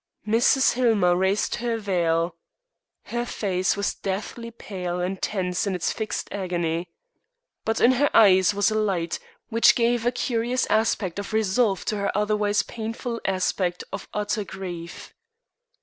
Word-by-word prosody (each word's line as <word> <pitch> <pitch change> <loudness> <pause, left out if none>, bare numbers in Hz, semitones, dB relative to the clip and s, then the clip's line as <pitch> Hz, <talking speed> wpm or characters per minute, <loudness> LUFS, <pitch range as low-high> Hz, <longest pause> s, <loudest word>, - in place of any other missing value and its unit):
Mrs. 240 +5 +4
Hillmer 220 -8 +3
raised 190 +3 +1
her 235 -1 -1
veil. 170 -5 0 0.7
Her 240 0 -3
face 190 -4 -1
was 200 - 0
deathly 215 +4 -4
pale 185 -6 -5
and 185 +1 -3
tense 185 -1 -1
in 195 - 0
its 175 - -1
fixed 220 -1 -3
agony. 175 -3 -2 0.8
But 225 0 0
in 245 - +6
her 280 +3 +2
eyes 190 -4 +6
was 205 +1 +1
a 215 - +1
light 175 -6 -1 0.3
which 230 0 +5
gave 240 -1 +2
a 240 - +2
curious 245 +1 0
aspect 215 -4 +1
of 205 +2 -6
resolve 215 -1 +1
to 215 - -1
her 200 0 -1
otherwise 210 0 +1
painful 230 +1 -5
aspect 185 -1 0
of - - -5
utter 210 +1 -1
grief. 180 -3 -8
205 Hz, 145 wpm, -24 LUFS, 185-225 Hz, 0.8 s, in